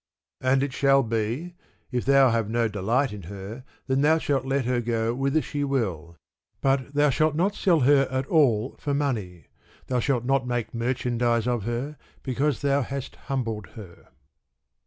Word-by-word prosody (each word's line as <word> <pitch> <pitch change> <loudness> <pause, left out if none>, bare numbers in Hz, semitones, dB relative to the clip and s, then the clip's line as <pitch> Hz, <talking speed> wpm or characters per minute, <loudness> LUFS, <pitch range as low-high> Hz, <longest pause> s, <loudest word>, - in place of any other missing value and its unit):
And 130 +1 +2
it 140 -2 -3
shall 135 0 +4
be, 115 +9 -2 0.4
if 125 -2 -2
thou 135 -1 +5
have 115 -2 0
no 115 0 +1
delight 110 +5 0
in 105 - -7
her, 100 +5 -8 0.2
then 135 0 +1
thou 155 +2 +4
shall 145 -3 0
let 135 0 -1
her 125 0 +1
go 115 -1 0
whither 135 +4 0
she 145 -1 -3
will; 95 - -2 0.4
but 135 +1 0
thou 145 0 +4
shalt 155 +3 +1
not 190 +6 +1
sell 175 -6 +2
her 135 +1 +4
at 130 0 -1
all 130 -7 +2
for 145 -1 -1
money, 110 - -2 0.4
thou 125 -1 0
shalt 120 -1 0
not 135 -1 +1
make 120 -2 -2
merchandise 120 -1 0
of 120 -5 -1
her, 125 +6 -3 0.3
because 135 +1 -1
thou 140 0 +2
hast 135 +1 -5
humbled 115 -7 -4
her. 95 -6 -12
130 Hz, 170 wpm, -25 LUFS, 115-140 Hz, 0.4 s, thou